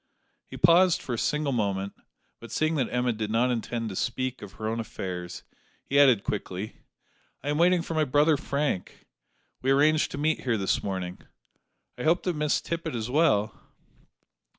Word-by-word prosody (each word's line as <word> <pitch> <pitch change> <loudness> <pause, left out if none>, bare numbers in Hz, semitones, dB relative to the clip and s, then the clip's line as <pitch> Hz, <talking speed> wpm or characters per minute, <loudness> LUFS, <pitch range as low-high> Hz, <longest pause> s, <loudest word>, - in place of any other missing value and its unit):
He - - -9
paused 175 +1 +5
for 125 - -5
a - - -2
single 150 -1 0
moment; 100 -4 -1 0.5
but, 115 - -11
seeing 155 +1 +1
that 130 -4 0
Emma 125 0 +1
did 110 -1 -4
not 120 +3 +2
intend 115 -1 -2
to 95 - -6
speak 130 +4 -2
of 100 -2 -9
her 110 - -5
own 115 +1 -2
affairs, 90 -5 -6 0.4
he 140 - +2
added 130 -8 +6
quickly: 100 0 -4 0.7
"I 145 - -3
am 150 +1 0
waiting 175 0 +4
for 165 - -5
my 155 -1 +2
brother 150 +3 +4
Frank. 140 -8 -3 0.6
We 130 - -1
arranged 150 +3 +4
to - - -4
meet 155 +2 +1
here 120 -3 0
this 95 -1 0
morning. 95 -2 -4 0.8
I - - -3
hope 165 +3 +2
that 180 -3 -1
Miss 150 0 +1
Tippet 165 -4 -4
is 115 +1 -3
well?" 110 -9 +3
125 Hz, 175 wpm, -27 LUFS, 110-150 Hz, 0.8 s, added